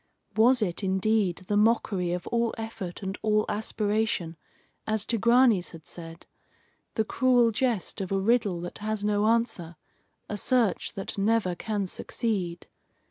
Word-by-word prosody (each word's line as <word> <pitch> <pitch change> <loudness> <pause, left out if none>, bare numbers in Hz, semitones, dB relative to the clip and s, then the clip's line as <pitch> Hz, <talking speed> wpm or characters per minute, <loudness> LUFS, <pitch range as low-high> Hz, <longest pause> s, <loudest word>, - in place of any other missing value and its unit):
Was 240 +2 +5
it, 180 0 -2
indeed, 190 -1 +1
the 205 - 0
mockery 205 -4 +2
of 180 0 -3
all 235 -1 0
effort 225 -5 -6
and 195 0 -3
all 215 -1 +2
aspiration, 210 -4 -1 0.5
as 215 -1 0
Tigranes 235 -4 +3
had 160 -2 -12
said 165 0 -10 0.7
the 220 - +1
cruel 245 -1 +3
jest 225 -4 -1
of 190 - -5
a 195 - +2
riddle 205 -3 +2
that 175 - -6
has 215 -1 -2
no 210 0 +2
answer, 225 -8 0 0.5
a 210 - -4
search 235 -3 +1
that 195 +1 -5
never 205 -2 +2
can 205 +2 -2
succeed? 185 -3 -3
210 Hz, 140 wpm, -27 LUFS, 185-225 Hz, 0.7 s, Was